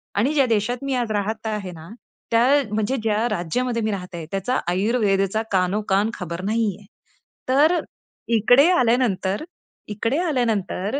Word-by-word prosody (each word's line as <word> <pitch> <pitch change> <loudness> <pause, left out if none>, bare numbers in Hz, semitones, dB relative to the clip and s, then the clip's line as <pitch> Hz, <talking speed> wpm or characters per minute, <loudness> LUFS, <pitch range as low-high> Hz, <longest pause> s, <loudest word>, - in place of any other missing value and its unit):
आणि 245 +9 +1
ज्या 280 -3 +4
देशात 230 +2 0
मी 275 -1 -2
आज 240 -3 -1
राहत 215 +2 -2
आहे 210 -4 -3
ना, 160 -1 -11 0.4
त्या 230 +1 +4 0.3
म्हणजे, 215 +4 0
ज्या 220 +1 +1
राज्यामध्ये 230 +6 -1
मी 220 0 -1
राहते 180 -4 -6
त्याचा 195 +6 -1
आयुर्वेदेचा 195 +1 +1
कानोकान 195 +2 +1
खबर 170 -3 -6
नाहीये. 210 -2 -1 0.6
तर 300 +7 +4 0.6
इकडे 245 +8 +5
आल्यानंतर, 230 - +1 0.4
इकडे 225 +6 -1
आल्यानंतर 235 - -1
215 Hz, 130 wpm, -22 LUFS, 195-245 Hz, 0.6 s, इकडे